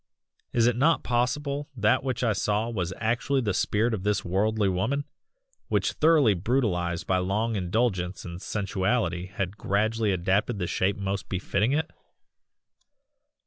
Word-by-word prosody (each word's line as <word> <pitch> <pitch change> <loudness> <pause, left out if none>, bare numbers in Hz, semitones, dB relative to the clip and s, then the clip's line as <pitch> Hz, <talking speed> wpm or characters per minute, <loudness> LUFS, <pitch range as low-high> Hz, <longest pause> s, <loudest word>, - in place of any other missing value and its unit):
Is 115 -1 +3
it 120 -1 +3
not 150 +7 +3
possible 140 +4 -1
that 110 +4 +3
what 130 -2 -2
I 115 -3 +3
saw 105 +3 0
was 95 -5 -2
actually 120 +4 0
the 105 -5 0
spirit 110 +5 +1
of 105 - -2
this 105 0 0
worldly 105 +3 +1
woman, 130 +10 0 0.6
which - - +1
thoroughly 155 -8 +4
brutalised 90 -5 0
by 95 -1 +1
long 105 +5 0
indulgence 95 -1 -1
in 85 0 -7
sensuality 95 -2 -1
had 100 +1 -4
gradually 110 +2 +1
adapted 95 +5 0
that 90 - -2
shape 95 +3 0
most 100 0 -3
befitting 100 +5 0
IT." 155 +2 -1
105 Hz, 145 wpm, -27 LUFS, 95-120 Hz, 0.6 s, thoroughly